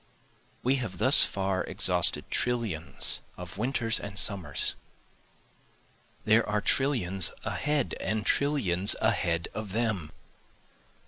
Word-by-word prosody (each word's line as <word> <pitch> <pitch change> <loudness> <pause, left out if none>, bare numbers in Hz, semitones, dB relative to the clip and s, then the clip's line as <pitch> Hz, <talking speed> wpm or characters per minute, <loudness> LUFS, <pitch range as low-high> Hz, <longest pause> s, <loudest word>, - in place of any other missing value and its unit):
We 130 +2 +1
have 110 -8 -6
thus - - +7
far 95 -1 -2
exhausted - - +4
trillions 100 - -1 0.2
of 90 +2 -10
winters 115 -2 -1
and 100 -1 -8
summers, 100 -3 0 1.5
There 110 +2 +3
are 105 0 0
trillions 100 - 0
ahead, 150 -1 -2
and 110 +1 -3
trillions 100 -11 +1
ahead 85 -1 -1
of 105 -3 -7
them. 105 -9 -3
105 Hz, 105 wpm, -27 LUFS, 90-120 Hz, 1.5 s, thus